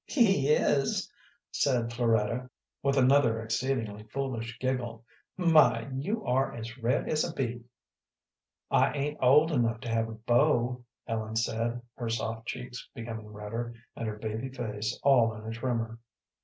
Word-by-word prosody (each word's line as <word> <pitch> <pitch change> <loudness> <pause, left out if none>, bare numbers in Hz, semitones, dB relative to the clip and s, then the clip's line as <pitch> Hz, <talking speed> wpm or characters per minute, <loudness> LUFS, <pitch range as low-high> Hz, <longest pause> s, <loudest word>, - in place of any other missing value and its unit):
"He 195 - +3
is," 140 -2 +2 0.4
said 120 -4 +1
Floretta, 115 +1 +1 0.3
with 140 0 +1
another 130 -3 +4
exceedingly 115 -2 -2
foolish 120 -1 -4
giggle. 120 -3 -2 0.3
"My, 165 -6 +5
you 190 +12 -3
are 130 +2 +1
as 115 0 -6
red 120 +3 +1
as 155 -1 +1
a - - -2
beet." 120 -2 -3 1.1
"I - - +4
ain't 150 +1 -2
old 150 +6 +6
enough 115 -5 +1
to 120 - -5
have 115 0 +1
a - - -6
beau," 120 +2 +2 0.2
Ellen 110 -1 -3
said, 115 +2 -1
her 120 -2 -3
soft 115 0 -3
cheeks 125 0 -6
becoming 115 -3 -6
redder, 110 +3 -5 0.2
and 115 - -4
her 105 -1 -4
baby 110 +4 -4
face 110 -5 -4
all 120 -5 +5
in 110 0 -9
a 110 - -4
tremor. 115 -1 -2
120 Hz, 145 wpm, -29 LUFS, 115-135 Hz, 1.1 s, old